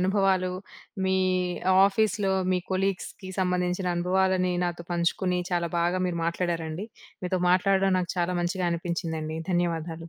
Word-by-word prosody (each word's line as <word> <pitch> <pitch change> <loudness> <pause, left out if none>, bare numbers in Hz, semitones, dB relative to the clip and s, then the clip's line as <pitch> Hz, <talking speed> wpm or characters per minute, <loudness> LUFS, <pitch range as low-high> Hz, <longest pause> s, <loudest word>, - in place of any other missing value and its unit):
అనుభవాలు, 190 -1 +2 0.5
మీ 190 0 +2 0.7
ఆఫీస్‌లో 200 -1 +1 0.2
మీ 180 - +2
కొలీగ్స్‌కి 190 0 -2
సంబంధించిన 180 0 0
అనుభవాలని 185 +1 +2
నాతో 175 -1 -3
పంచుకుని 180 +1 0
చాలా 170 -1 0
బాగా 175 +2 +1
మీరు 170 -1 -2
మాట్లాడారండి. 170 +2 -2 0.4
మీతో 180 0 -1
మాట్లాడడం 195 +1 +3
నాకు 180 -1 -2
చాలా 175 +1 0
మంచిగా 180 +1 -1
అనిపించిందండి. 165 -2 -3
ధన్యవాదాలు. 165 -2 -1
180 Hz, 120 wpm, -27 LUFS, 170-190 Hz, 0.7 s, మాట్లాడడం